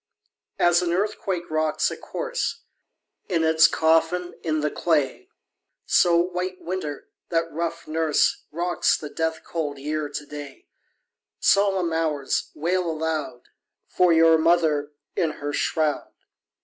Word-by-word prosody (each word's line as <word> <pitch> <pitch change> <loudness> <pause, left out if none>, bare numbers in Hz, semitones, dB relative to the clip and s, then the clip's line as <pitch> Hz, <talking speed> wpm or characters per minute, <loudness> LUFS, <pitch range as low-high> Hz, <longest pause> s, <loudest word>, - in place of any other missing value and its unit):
2. - - -1
As 175 0 +5
an 175 -1 -1
earthquake 190 -2 -2
rocks 155 -1 +1
a - - -4
corse - - -4 0.7
In 170 -4 +1
its 160 +1 +6
coffin 165 +2 +1
in 155 -2 -1
the 150 0 0
clay, 150 -6 0 0.6
So 170 -1 +4
White 180 +1 -1
Winter, 165 -5 -5 0.2
that 165 -1 0
rough 170 +1 -4
nurse, 155 -1 +1
Rocks 175 +3 +1
the 150 -2 -8
death 160 0 -2
cold 150 -4 -4
Year 150 +1 -3
to 145 +1 -6
day; 145 -2 -9 0.7
_10 - - -21
Solemn 195 -4 +3
Hours! 155 -4 -1
wail 175 +3 0
aloud 155 -5 -3 0.4
For 180 -1 +2
your 165 0 +6
mother 160 -3 +2 0.2
in 160 -2 0
her 145 0 -5
shroud. 155 -1 0
160 Hz, 135 wpm, -24 LUFS, 150-175 Hz, 0.7 s, its